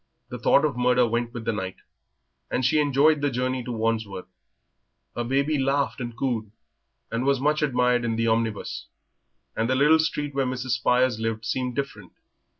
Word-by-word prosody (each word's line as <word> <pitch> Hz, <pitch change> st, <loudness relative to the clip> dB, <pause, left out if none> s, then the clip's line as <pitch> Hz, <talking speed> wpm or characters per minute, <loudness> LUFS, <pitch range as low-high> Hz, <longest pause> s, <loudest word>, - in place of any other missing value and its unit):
The 125 Hz, -1 st, -6 dB
thought 140 Hz, +4 st, +4 dB
of 145 Hz, -4 st, -1 dB
murder 125 Hz, 0 st, +3 dB
went 120 Hz, +1 st, -1 dB
with 120 Hz, -2 st, -7 dB
the 115 Hz, -, +1 dB
night, 95 Hz, -2 st, -4 dB, 0.7 s
and 130 Hz, -, -1 dB
she 155 Hz, +5 st, +3 dB
enjoyed 145 Hz, +1 st, +3 dB
the 145 Hz, -, +2 dB
journey 130 Hz, 0 st, -2 dB
to 125 Hz, -, -5 dB
Wandsworth. 110 Hz, -4 st, -2 dB, 0.9 s
Her 120 Hz, -, -1 dB
baby 140 Hz, +4 st, +1 dB
laughed 135 Hz, 0 st, 0 dB
and 120 Hz, -1 st, -6 dB
cooed, 120 Hz, -6 st, -2 dB, 0.6 s
and 115 Hz, +2 st, -1 dB
was 140 Hz, -1 st, +2 dB
much 150 Hz, +3 st, +1 dB
admired 125 Hz, -4 st, +2 dB
in 115 Hz, -1 st, -1 dB
the 115 Hz, 0 st, 0 dB
omnibus, 110 Hz, -2 st, -1 dB, 0.7 s
and 115 Hz, +1 st, 0 dB
the 130 Hz, -, +2 dB
little 150 Hz, +4 st, +5 dB
street 150 Hz, -2 st, -1 dB
where 135 Hz, -1 st, 0 dB
Mrs. 130 Hz, 0 st, -3 dB
Spires 125 Hz, 0 st, +2 dB
lived 115 Hz, 0 st, -3 dB
seemed 125 Hz, -1 st, -2 dB
different. 125 Hz, -9 st, -5 dB
125 Hz, 175 wpm, -25 LUFS, 115-140 Hz, 0.9 s, little